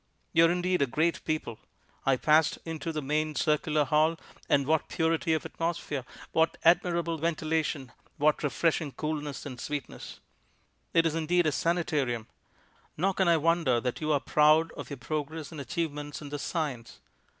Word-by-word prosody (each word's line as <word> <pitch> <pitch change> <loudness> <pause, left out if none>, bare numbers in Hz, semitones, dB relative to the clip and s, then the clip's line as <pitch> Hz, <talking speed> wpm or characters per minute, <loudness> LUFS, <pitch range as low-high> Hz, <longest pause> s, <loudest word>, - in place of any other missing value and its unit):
You 165 0 +6
are - - +2
indeed 180 0 0
a 140 - +3
great 155 +6 0
people. 155 -8 -3 0.5
I 135 -1 +4
passed 155 +3 +3
into 165 0 -4
the 155 -2 -4
main 155 +2 -1
circular 150 0 +1
hall, 155 +4 +2 0.3
and 140 -1 +3
what 160 +2 +1
purity 160 0 +1
of 155 - -3
atmosphere, 165 -5 -3 0.3
what 160 0 +2
admirable 170 -1 +3
ventilation, 155 -4 -1 0.3
what 150 +1 +2
refreshing 155 0 0
coolness 150 -2 -4
and 130 -4 -7
sweetness; 145 -3 -6 0.7
it 165 0 +4
is, 160 - +1
indeed, 165 +2 +1
a 155 - +3
sanitarium; 145 -9 0 0.7
nor 190 +5 +1
can 190 -1 +1
I 170 -1 +5
wonder 160 -6 +2
that 125 +4 -3
you 155 0 0
are 145 - +3
proud 155 +3 +4
of - - -8
your 140 - -6
progress 150 +4 -4
and 155 -3 -6
achievements 145 +1 -4
in 145 - -8
this 145 0 -5
science. 140 -9 -3
155 Hz, 160 wpm, -29 LUFS, 145-165 Hz, 0.7 s, You